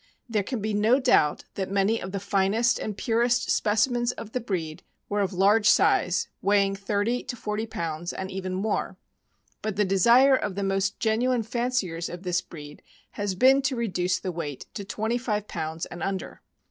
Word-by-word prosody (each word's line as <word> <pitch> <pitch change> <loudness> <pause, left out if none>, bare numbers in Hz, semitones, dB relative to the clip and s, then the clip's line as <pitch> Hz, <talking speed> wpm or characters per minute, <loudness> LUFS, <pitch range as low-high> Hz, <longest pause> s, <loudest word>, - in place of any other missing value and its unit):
There 220 -3 0
can 225 +3 -4
be 215 +1 -2
no 220 +6 +3
doubt 240 - +3
that 190 -1 -3
many 200 +3 +1
of 185 - -6
the 200 - -3
finest 200 +4 +1
and 210 -2 -4
purest 240 +2 +1
specimens 240 +3 +2
of 220 - -9
the 250 - -1
breed 175 -9 -4 0.3
were 205 0 0
of 195 -1 0
large 205 +3 +4
size, 180 +1 +3
weighing 200 -1 +2
thirty 205 +4 -1
to - - -4
forty 215 0 -3
pounds, 170 -4 -4
and 190 0 -5
even 185 -1 -4
more; 205 +4 -2 0.6
but 215 -2 -3
the 210 0 +2
desire 235 +8 +5
of 205 -7 -2
the 200 - -2
most 195 0 0
genuine 235 +2 +1
fanciers 225 -8 -2
of 175 +1 -8
this 180 -1 0
breed 150 -4 -11 0.3
has 205 -2 -3
been 265 +6 +5
to 270 -1 -1
reduce 185 -6 0
the 185 - -4
weight 150 -5 -5
to 200 - -5
twenty 220 +4 -2
live 210 -4 -2
pounds 160 0 -4
and 175 - -9
under. 195 +1 -4
205 Hz, 185 wpm, -26 LUFS, 185-230 Hz, 0.6 s, desire